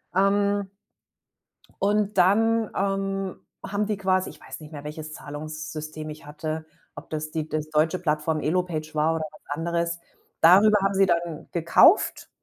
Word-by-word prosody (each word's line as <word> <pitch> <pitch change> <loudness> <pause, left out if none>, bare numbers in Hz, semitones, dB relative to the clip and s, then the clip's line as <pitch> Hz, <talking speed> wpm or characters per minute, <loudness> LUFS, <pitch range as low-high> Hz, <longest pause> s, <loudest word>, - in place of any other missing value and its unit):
ähm 200 0 +2 1.1
und 205 0 +1
dann, 220 +4 +3
ähm, 195 -1 -1 0.3
haben 205 +1 -1
die 210 -1 -1
quasi 185 -1 +1
ich - - -15
weiß - - -9
nicht 155 0 -12
mehr, 145 -1 -8
welches 155 +1 -7
Zahlungssystem 155 +1 -7
ich 150 -1 -11
hatte, 155 +1 -5 0.3
ob - - -11
das 155 0 -4
die 155 -1 -3
das 155 -1 -3
deutsche 155 +4 +2
Plattform 155 -2 0
Elopage 155 -1 -1
war 155 +2 +2
oder 160 - -2
was 155 - -16 0.2
anderes. 170 +1 -1 0.4
Darüber 205 +5 +7
haben 195 0 +1
sie 195 0 +4
dann 170 -3 -1
gekauft 170 -1 +4
170 Hz, 150 wpm, -25 LUFS, 155-195 Hz, 1.1 s, Darüber